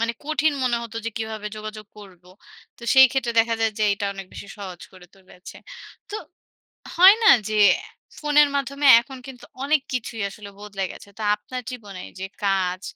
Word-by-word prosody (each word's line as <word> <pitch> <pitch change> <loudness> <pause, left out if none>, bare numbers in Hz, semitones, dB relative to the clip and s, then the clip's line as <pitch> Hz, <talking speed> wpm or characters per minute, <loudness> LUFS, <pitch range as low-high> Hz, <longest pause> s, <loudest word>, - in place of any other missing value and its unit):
মানে 230 0 0
কঠিন 310 0 +1
মনে 245 -2 +1
হতো 230 -1 -8
যে, 230 - -2
"কীভাবে 220 -2 -5
যোগাযোগ 215 0 -8
করবো!" 180 -3 -15 0.5
তো - - -19
সেই 265 0 +9
ক্ষেত্রে 255 -3 -1
দেখা 230 0 0
যায় 225 -1 +1
যে - - 0
এইটা 200 0 -1
অনেক 195 -1 -8
বেশি - - -9
সহজ 185 -3 -8
করে 185 -1 -15
তুলেছে। 190 -1 -15 0.5
তো 415 - -3 0.8
হয় 375 +4 +8
না - - +5 0.2
যে, 215 - -1 0.6
ফোনের 295 -1 +4
মাধ্যমে 280 +1 -2 0.2
এখন 265 +2 -11
কিন্তু 255 -2 -11 0.2
অনেক 295 0 +2
কিছুই 230 -2 -4
আসলে 200 0 -11
বদলে 205 -2 -5
গেছে। - - -14
তো - - -8
আপনার 250 +4 -8
জীবনে 205 -7 -9 0.2
যে 190 - -4 0.2
কাজ, 185 -2 0
220 Hz, 175 wpm, -23 LUFS, 200-265 Hz, 0.8 s, সেই